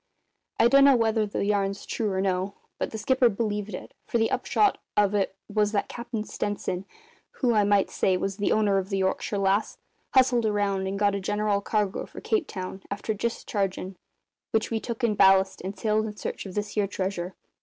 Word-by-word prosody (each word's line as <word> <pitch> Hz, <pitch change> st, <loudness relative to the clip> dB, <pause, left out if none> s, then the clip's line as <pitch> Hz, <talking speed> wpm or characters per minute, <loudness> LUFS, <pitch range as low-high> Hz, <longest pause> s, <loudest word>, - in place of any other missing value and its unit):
I 230 Hz, -, +7 dB
dunno 275 Hz, +2 st, +7 dB
whether 220 Hz, -2 st, +2 dB
the 200 Hz, -, -2 dB
yarn's 200 Hz, -1 st, 0 dB
true 215 Hz, -3 st, -2 dB
or 190 Hz, 0 st, 0 dB
no, 190 Hz, +1 st, -1 dB, 0.2 s
but -, -, -1 dB
the 220 Hz, -, -6 dB
skipper 260 Hz, +2 st, +3 dB
believed 210 Hz, -2 st, -2 dB
it, -, -, -9 dB
for -, -, +1 dB
the 225 Hz, -1 st, +1 dB
upshot 415 Hz, -1 st, +2 dB, 0.2 s
of 205 Hz, -1 st, +4 dB
it 195 Hz, -2 st, 0 dB
was 210 Hz, 0 st, +1 dB
that 205 Hz, -, 0 dB
Cap'n 235 Hz, -2 st, -4 dB
Stenson 200 Hz, -3 st, -3 dB, 0.5 s
who, 245 Hz, -3 st, +1 dB
I 210 Hz, -2 st, +4 dB
might 200 Hz, -1 st, +2 dB
say, 185 Hz, -1 st, +2 dB
was 195 Hz, +1 st, -3 dB
the 205 Hz, -, 0 dB
owner 205 Hz, -2 st, +3 dB
of 190 Hz, 0 st, -5 dB
the 195 Hz, -, -1 dB
Yorkshire 190 Hz, +2 st, -1 dB
Lass 195 Hz, +2 st, +1 dB, 0.4 s
hustled 250 Hz, -3 st, +4 dB
around 200 Hz, -2 st, 0 dB
and 195 Hz, +1 st, -2 dB
got 205 Hz, 0 st, +2 dB
a 200 Hz, -, -1 dB
general 205 Hz, +1 st, 0 dB
cargo 205 Hz, -2 st, -1 dB
for -, -, -10 dB
Cape 425 Hz, -8 st, 0 dB
Town, 190 Hz, 0 st, -6 dB
after 200 Hz, +2 st, -2 dB
dischargin' 195 Hz, -3 st, -2 dB, 0.5 s
which 220 Hz, +1 st, 0 dB
we 225 Hz, -, 0 dB
took 235 Hz, +2 st, -6 dB
in 230 Hz, -2 st, +3 dB
ballast 190 Hz, -1 st, +4 dB
and 190 Hz, +2 st, -5 dB
sailed 215 Hz, +1 st, +1 dB
in 210 Hz, -1 st, -8 dB
search -, -, -5 dB
of 185 Hz, -, -9 dB
this 210 Hz, 0 st, -2 dB
here 205 Hz, -1 st, 0 dB
treasure. 185 Hz, -2 st, -3 dB
205 Hz, 195 wpm, -26 LUFS, 195-220 Hz, 0.5 s, I